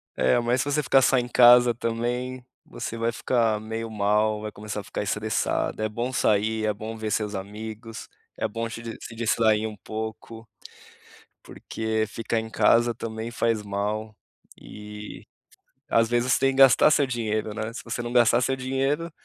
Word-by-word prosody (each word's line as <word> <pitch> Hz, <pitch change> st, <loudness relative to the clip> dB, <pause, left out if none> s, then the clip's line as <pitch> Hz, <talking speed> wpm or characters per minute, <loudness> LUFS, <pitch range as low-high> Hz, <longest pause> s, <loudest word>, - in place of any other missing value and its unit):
é 65 Hz, 0 st, +3 dB
mas 120 Hz, +2 st, +1 dB
se -, -, -2 dB
você 150 Hz, +1 st, +1 dB
ficar 135 Hz, 0 st, +4 dB
só 135 Hz, 0 st, +3 dB
em 120 Hz, -1 st, 0 dB
casa 120 Hz, 0 st, +7 dB
também, 120 Hz, +2 st, -3 dB, 0.2 s
você 115 Hz, -, -6 dB
vai 115 Hz, +1 st, 0 dB
ficar 115 Hz, -2 st, 0 dB
meio 110 Hz, +1 st, -5 dB
mal, 105 Hz, 0 st, +1 dB
vai 105 Hz, 0 st, -5 dB
começar 105 Hz, 0 st, -6 dB
a -, -, -14 dB
ficar -, -, -5 dB
estressada, 105 Hz, -, -1 dB
é 110 Hz, -, 0 dB
bom 120 Hz, +4 st, -3 dB
sair, 110 Hz, 0 st, +1 dB
é 105 Hz, -, +1 dB
bom 110 Hz, +2 st, -7 dB
ver 110 Hz, -1 st, -4 dB
seus 105 Hz, 0 st, -1 dB
amigos, 110 Hz, +3 st, -7 dB, 0.3 s
é -, -, -1 dB
bom 115 Hz, +2 st, -4 dB
se 115 Hz, +1 st, -8 dB
dis 115 Hz, -1 st, -7 dB
se 115 Hz, -, -9 dB
distrair 110 Hz, -1 st, +2 dB
um 110 Hz, -1 st, -5 dB
pouco, 110 Hz, +3 st, -7 dB, 0.9 s
porque 110 Hz, 0 st, -3 dB
ficar 115 Hz, +2 st, -2 dB
em 110 Hz, 0 st, -7 dB
casa 115 Hz, +3 st, +3 dB
também 115 Hz, 0 st, -6 dB
faz 115 Hz, -3 st, 0 dB
mal, 105 Hz, +2 st, -3 dB, 0.5 s
e 105 Hz, 0 st, -10 dB, 0.6 s
às 115 Hz, 0 st, +3 dB
vezes 120 Hz, +2 st, +1 dB
você -, -, +3 dB
tem 135 Hz, -, +3 dB
que 135 Hz, -, -6 dB
gastar 135 Hz, +2 st, +7 dB
seu 145 Hz, -2 st, +4 dB
dinheiro, 110 Hz, -3 st, -2 dB
né, 110 Hz, +1 st, -5 dB
se -, -, -7 dB
você 115 Hz, +1 st, -4 dB
não 120 Hz, +1 st, -5 dB
gastar 120 Hz, -1 st, +5 dB
seu 130 Hz, +1 st, 0 dB
dinheiro, 135 Hz, +6 st, -1 dB
110 Hz, 180 wpm, -25 LUFS, 110-120 Hz, 0.9 s, casa